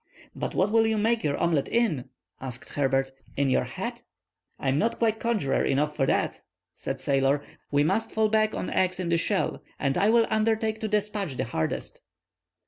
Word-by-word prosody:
"But - - -4
what 195 +3 +2
will 225 0 +4
you 220 0 +1
make 225 +2 +1
your 145 -2 0
omelet 165 -5 +1
in?" 170 - 0 0.3
asked 125 -2 -6
Herbert; 135 -1 +1 0.3
"in 140 -1 +2
your - - +2
hat?" - - -5 0.6
"I 135 - -1
am 135 +3 +2
not 230 - +1
quite 225 -1 +1
conjurer 220 -12 +1
enough 150 +2 +1
for 135 -3 +1
that," - - 0 0.3
said - - -4
the - - -15
sailor. 135 +1 +2 0.3
"We 145 0 +3
must 220 +8 0
fall 220 0 +2
back 215 0 +2
on - - -3
eggs 185 0 +1
in 180 -2 -2
the 170 - +3
shell, 195 +3 0 0.2
and 135 -2 0
I 205 - +4
will 230 0 +5
undertake 220 0 +1
to 220 - -2
despatch 205 - -1
the 130 - 0
hardest." 80 -9 -3
185 Hz, 195 wpm, -27 LUFS, 140-220 Hz, 0.6 s, will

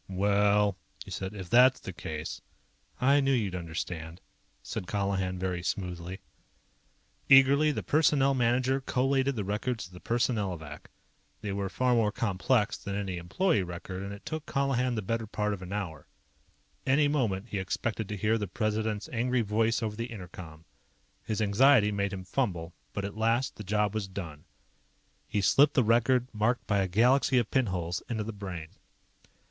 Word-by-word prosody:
"Well 100 +1 +2
..." - - -13
he - - -11
said. 95 +2 -4
"If 95 -3 -8
that's 125 +2 +6
the 95 - -7
case 80 -2 -6 0.3
" - - -38
"I 140 +3 +4
knew 135 -1 +2
you'd 105 -7 0
understand," 85 -1 -5 0.4
said 90 - -5
Colihan 95 -2 -1
very 90 -1 -2
smoothly. 90 0 -4 1.1
Eagerly, 140 +3 +7
the - - -3
Personnel 145 -3 +3
Manager 130 +2 +1
collated 135 +1 +1
the 105 - -2
records 105 +4 -2
of 90 - -15
the 90 - -10
Personnelovac. 95 - -2 0.5
They 105 - -3
were 100 -1 -2
far 125 +3 +1
more 110 -3 +3
complex 105 +2 +1
than 100 - -5
any 95 -3 -3
employee 105 - +1
record, 90 +1 -6
and 100 0 -5
it 100 0 -10
took 155 0 -5
Colihan 130 -3 0
the 110 - -2
better 115 +3 -2
part 105 0 -1
of 100 - -6
an 90 0 -8
hour. 90 -8 -5 0.8
Any 140 +3 +3
moment 115 -8 -1
he 100 - -2
expected 110 +2 -3
to 105 - -3
hear 110 +3 +1
the 105 - -2
President's 110 +1 -2
angry 125 +1 +1
voice 115 +2 +1
over 105 -1 -2
the 115 +2 -4
inter 95 -6 -8
com. 80 -2 -11 0.6
His 110 0 -1
anxiety 105 +1 +5
made 100 -1 -1
him 95 -2 -5
fumble, 90 -6 -2 0.2
but 100 - -3
at 100 - -6
last, 115 +4 +1
the 105 - -8
job 105 +1 0
was 110 -3 -2
done. 85 -6 -8 0.8
He 105 - 0
slipped 145 - +4
the 130 - +5
record, 120 +3 +3
marked 110 +4 0
by 100 -1 +1
a 95 - +1
galaxy 125 +7 +3
of 120 -3 +1
pinholes, 90 -9 0
into 110 -3 -2
the 110 +1 -5
Brain. 95 -6 -6
105 Hz, 175 wpm, -29 LUFS, 95-125 Hz, 1.1 s, Eagerly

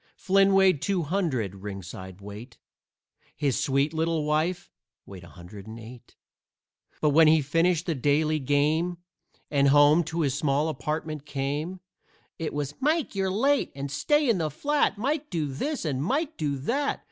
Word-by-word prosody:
Flynn 195 0 +3
weighed 190 -6 +4
two 185 +1 0
hundred, 145 - -1
ringside 95 -1 -8
weight, 105 +5 -10 0.8
His 140 -4 0
sweet 140 +1 +1
little 160 -1 0
wife 155 +4 -1 0.3
weighed 95 -2 -11
a - - -12
hundred 95 +3 -12
and 110 +1 -9
eight; 115 +2 -13 0.9
But 150 - +3
when 160 +2 +6
he 160 +1 +6
finished 165 +4 +1
the 170 - 0
daily 150 +3 +1
game 150 +5 +1 0.5
And 140 -1 +3
home 145 +4 +6
to 165 +2 -2
his 140 -4 +1
small 145 +1 +1
apartment 155 -1 -4
came 145 +6 -3 0.6
It 165 - -3
was 145 -1 -3
"Mike, 310 +3 0
you're 195 -1 0
late!" 270 +9 +1
and 140 0 -5
"Stay 295 - +2
in 225 -6 +2
the 155 -2 0
flat!" 290 - 0
"Mike, 290 +7 -2
do 160 -3 -1
this!" 200 - -3
and 135 -4 -1
"Mike, 290 - -1
do 145 -3 -2
that!" 275 - -1
155 Hz, 160 wpm, -26 LUFS, 140-185 Hz, 0.9 s, when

